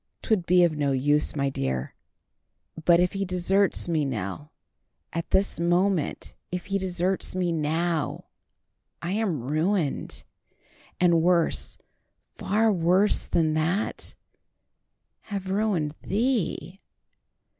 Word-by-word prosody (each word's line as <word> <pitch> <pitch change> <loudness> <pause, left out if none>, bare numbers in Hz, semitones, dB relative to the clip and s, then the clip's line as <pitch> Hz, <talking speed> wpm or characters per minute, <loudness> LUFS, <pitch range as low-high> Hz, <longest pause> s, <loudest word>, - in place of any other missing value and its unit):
"'Twould 200 -6 0
be 180 0 +5
of 165 -3 +2
no 145 -2 0
use, 145 +4 +2
my 140 -1 0
dear. 65 - -3 0.9
But 170 -1 +6
if 180 0 +2
he 195 0 -1
deserts 185 +1 +1
me, 160 -3 +1
Nell, 125 - -4 0.6
at 170 0 -3
this 195 -2 +1
moment, 175 0 0 0.2
if 180 -1 -4
he 195 0 -1
deserts 185 0 -1
me 180 -2 0
now, 160 +1 -1 0.8
I 170 - -2
am 195 - -1
ruined; 155 +3 -1 0.8
and 170 -2 +4
worse—far 180 +4 -1
worse 185 +4 +3
than 160 -2 +1
that—have 190 +2 -6
ruined 195 -8 0
thee. 200 - -1
175 Hz, 105 wpm, -26 LUFS, 155-195 Hz, 0.9 s, But